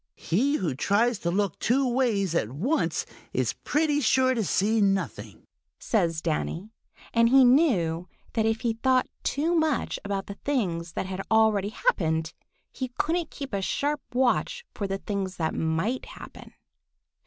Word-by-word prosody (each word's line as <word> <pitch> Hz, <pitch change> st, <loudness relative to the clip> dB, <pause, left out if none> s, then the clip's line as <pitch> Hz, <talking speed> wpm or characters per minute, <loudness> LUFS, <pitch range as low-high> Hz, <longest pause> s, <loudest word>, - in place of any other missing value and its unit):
"He 255 Hz, -, +1 dB
who 180 Hz, -, -1 dB
tries 205 Hz, -, +1 dB
to 170 Hz, -, -1 dB
look 195 Hz, 0 st, -1 dB
two 265 Hz, +3 st, +2 dB
ways 230 Hz, -8 st, +1 dB
at 140 Hz, -10 st, 0 dB
once 230 Hz, -, 0 dB, 0.3 s
is -, -, 0 dB
pretty 295 Hz, -1 st, 0 dB
sure 260 Hz, +1 st, +3 dB
to 230 Hz, -3 st, 0 dB
see 210 Hz, +4 st, +1 dB
nothing," 195 Hz, -1 st, -1 dB, 0.3 s
says 170 Hz, -7 st, 0 dB
Danny, 170 Hz, +5 st, -2 dB, 0.4 s
and 230 Hz, 0 st, +4 dB
he 265 Hz, +1 st, +7 dB
knew 190 Hz, -, +3 dB, 0.3 s
that 220 Hz, -1 st, +1 dB
if 225 Hz, 0 st, 0 dB
he 235 Hz, -2 st, 0 dB
thought 255 Hz, +3 st, +2 dB
too 315 Hz, +5 st, 0 dB
much 315 Hz, -5 st, 0 dB
about 200 Hz, -1 st, -3 dB
the 200 Hz, -, -9 dB
things 175 Hz, -, -1 dB
that -, -, -3 dB
had 190 Hz, 0 st, -4 dB
already 220 Hz, -2 st, +3 dB
happened, 160 Hz, -, 0 dB, 0.4 s
he 260 Hz, -, -4 dB
couldn't 335 Hz, +1 st, 0 dB
keep 275 Hz, -5 st, -8 dB
a 200 Hz, -, 0 dB
sharp 290 Hz, +8 st, -1 dB
watch 260 Hz, -, 0 dB
for 200 Hz, -, -3 dB
the 195 Hz, 0 st, -2 dB
things 195 Hz, -2 st, -4 dB
that 160 Hz, -2 st, -1 dB
might 165 Hz, +11 st, -1 dB
happen. -, -, -12 dB
220 Hz, 155 wpm, -26 LUFS, 185-260 Hz, 0.4 s, he